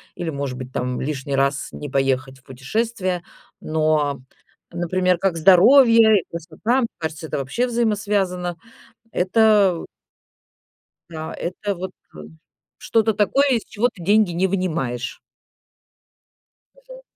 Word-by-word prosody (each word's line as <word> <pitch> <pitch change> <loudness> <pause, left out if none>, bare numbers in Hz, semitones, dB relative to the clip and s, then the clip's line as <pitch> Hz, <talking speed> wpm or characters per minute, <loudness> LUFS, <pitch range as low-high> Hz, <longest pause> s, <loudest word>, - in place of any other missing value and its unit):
или 175 - -4
может 140 -4 -4
быть 130 0 -8
там 125 0 -2
лишний 140 -1 -3
раз 140 +1 0
не 145 - -7
поехать 135 0 -1
в - - -29
путешествие. 185 - -3 0.4
Но, 155 -2 0 0.5
например, 180 +1 0
как 180 -1 -1
здоровье 220 - +6
и - - -23
красота, 170 +10 -2
мне 235 - 0
кажется, 160 0 -5
это - - -3
вообще 140 - -1
взаимосвязано. 200 -6 -1 0.6
Это 200 -2 +3 1.3
Да. 160 -1 -6
Это 200 +3 -4
вот 185 +1 -6 0.2
ка 75 - -12 0.6
что-то 225 -1 +1
такое, 215 +8 +2
из 235 -4 +1
чего 220 +3 0
ты 180 - -11
деньги 205 +1 +3
не 175 +3 +1
вынимаешь. 160 -10 -3 1.6
Мгм. - - -14
180 Hz, 120 wpm, -21 LUFS, 145-215 Hz, 1.6 s, здоровье